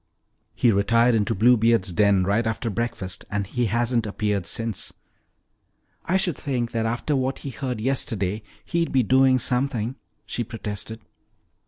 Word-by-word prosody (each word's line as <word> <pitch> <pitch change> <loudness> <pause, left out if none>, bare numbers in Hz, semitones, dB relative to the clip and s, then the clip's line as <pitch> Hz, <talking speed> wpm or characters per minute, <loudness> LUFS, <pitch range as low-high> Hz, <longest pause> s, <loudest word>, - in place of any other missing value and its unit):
"He 120 - +3
retired 115 +4 +3
into 110 +1 +1
Bluebeard's 115 -2 +4
den 100 0 +3
right 105 +5 +1
after 115 +1 -2
breakfast 100 -4 -4
and 105 -1 -1
he 120 +4 -1
hasn't 120 +1 0
appeared 100 -3 -1
since." 115 -3 -3 1.1
"I 185 - +2
should 190 -5 +1
think 120 -4 -2
that 115 -1 -1
after 120 +6 -1
what 130 0 -1
he 140 - -3
heard 125 -3 -4
yesterday 110 -5 -1 0.2
he'd 170 -1 -1
be 130 -2 +3
doing 130 +2 +4
something," 125 -1 -1 0.3
she 120 - -3
protested. 110 0 -6
115 Hz, 145 wpm, -24 LUFS, 105-125 Hz, 1.1 s, Bluebeard's